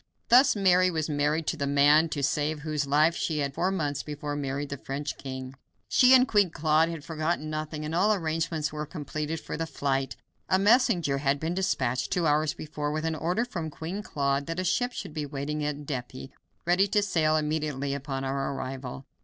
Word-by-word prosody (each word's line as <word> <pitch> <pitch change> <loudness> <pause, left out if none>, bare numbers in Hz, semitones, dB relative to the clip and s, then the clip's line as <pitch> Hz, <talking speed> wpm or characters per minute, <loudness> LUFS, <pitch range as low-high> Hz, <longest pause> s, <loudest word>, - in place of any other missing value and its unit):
Thus 255 +2 +6
Mary 185 -2 +4
was 160 -3 -2
married 150 +2 0
to 165 - -1
the 140 -2 -1
man 145 +3 +5
to 145 -2 -3
save 150 +2 0
whose 150 -2 -2
life 155 +4 +3
she 160 - -1
had 140 -2 -1
four 180 +6 0
months 145 -7 -1
before 150 -1 -5
married 140 0 -3
the 140 - -4
French 140 +2 -4
king. 130 -1 -7 0.4
She 255 +1 +7
and 255 0 +5
Queen 205 -4 +3
Claude 160 0 +2
had 165 -3 -6
forgotten 155 -1 -2
nothing, 155 0 -4
and 155 - -4
all 190 +5 +3
arrangements 160 -4 -1
were 150 0 -4
completed 155 +1 -4
for - - -6
the 165 +1 -2
flight. 135 -3 -1 0.3
A 185 - +4
messenger 190 - +3
had 140 0 +1
been 160 +3 -2
dispatched 130 -9 0
two 175 -2 0
hours 150 0 +2
before 150 -1 -4
with 155 +1 -2
an 160 - 0
order 175 +9 -1
from 170 -10 -4
Queen 165 +6 -5
Claude 140 -6 -1
that 165 +2 -3
a - - 0
ship 245 +7 +1
should 155 - -7
be 150 -2 -3
waiting 145 +2 -3
at 150 0 -3
Dieppe, 130 -1 -6 0.3
ready 180 +3 +3
to 205 +1 +2
sail 155 -5 +2
immediately 150 -3 -1
upon 135 -1 -4
our 135 +1 -2
arrival. 130 0 -6
155 Hz, 200 wpm, -27 LUFS, 140-165 Hz, 0.4 s, She